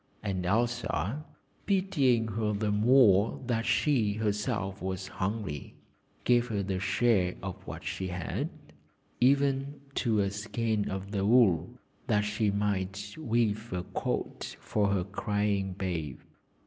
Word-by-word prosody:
And 95 -3 -2
Elsa, 120 - 0 0.4
pitying 140 - +2
her 105 0 -1
the 105 0 0
more 110 -2 +5
that 115 -1 0
she 120 -9 +2
herself 105 -2 -2
was 95 0 -3
hungry, 95 -7 -4 0.5
gave 120 -1 +3
her 110 -4 -2
a 95 -2 -1
share 95 -2 +2
of 95 -2 -4
what - - -7
she 95 - -3
had, 90 -4 -3 0.7
even 140 +2 +2 0.2
to 115 -4 +2
a 100 -1 0
skein 110 0 -1
of 95 +1 -5
the 100 -2 -1
wool, 105 -2 +4 0.3
that 105 -4 +3
she 105 +1 0
might 100 0 -1
weave 115 -5 0
a 90 -1 -2
coat - - -3
for 105 -2 0
her 100 -2 +1
crying 100 0 -1
babe. 85 -8 -3
105 Hz, 130 wpm, -30 LUFS, 95-120 Hz, 0.7 s, more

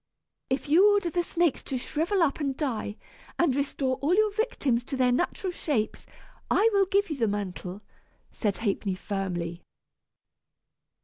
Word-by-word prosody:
"If 265 +2 -1
you 365 +8 +6
order 400 -4 +1
the 350 - +1
snakes 345 -3 +1
to 265 - -2
shrivel 335 +9 0
up 285 -2 +1
and 275 -3 -1
die, 230 -7 -2 0.4
and 310 -7 +3
restore 275 -2 -1
all 310 +6 +2
your 425 0 +3
victims 290 - 0
to 270 - -4
their 250 -1 +3
natural 355 +7 0
shapes, 240 -11 -2 0.4
I 430 - +4
will 395 -1 +4
give 400 -1 +1
you 300 - -2
the 230 -4 +2
mantle," 200 -1 -4 0.5
said 205 -4 -1
Ha'penny 200 -3 -1
firmly. 180 -3 -3
275 Hz, 150 wpm, -27 LUFS, 215-350 Hz, 0.5 s, you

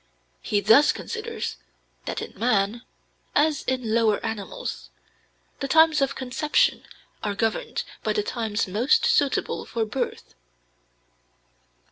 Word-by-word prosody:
He 205 - 0
thus 225 +9 +6
considers 460 0 -5 0.5
that - - -3
in - - -9
man, 220 -1 +1 0.5
as 300 0 +3
in 255 -4 -1
lower 225 -3 +3
animals, 200 - -5 0.7
the 275 - -2
times 320 +1 +5
of 275 - +1
conception 265 +4 +1 0.4
are 205 -1 -1
governed 225 +1 -1 0.2
by - - 0
the 420 - 0
times 225 - -2
most 245 - +2
suitable 290 - +1
for 230 -1 -2
birth. 205 - -4
240 Hz, 115 wpm, -25 LUFS, 215-295 Hz, 0.7 s, thus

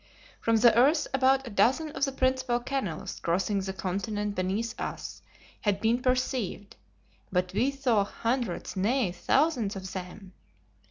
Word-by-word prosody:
From 230 - +2
the 225 0 +6
earth 290 +6 +4
about 270 0 +3
a 240 - -7
dozen 260 +10 +2
of 280 - 0
the 275 - -3
principal 260 -2 +1
canals 240 - -4
crossing 190 +4 0
the 190 0 -3
continent 200 +3 -3
beneath 200 +5 -1
us - - -5 0.4
had 205 -2 +1
been 230 +4 +1
perceived, 250 -5 -1 0.6
but 180 -1 0
we 255 +4 +2
saw 260 -7 +1
hundreds, 230 0 -2
nay, 215 +2 +1
thousands 230 - +1
of 190 -1 -7
them! 185 +1 -8
225 Hz, 145 wpm, -28 LUFS, 195-260 Hz, 0.6 s, the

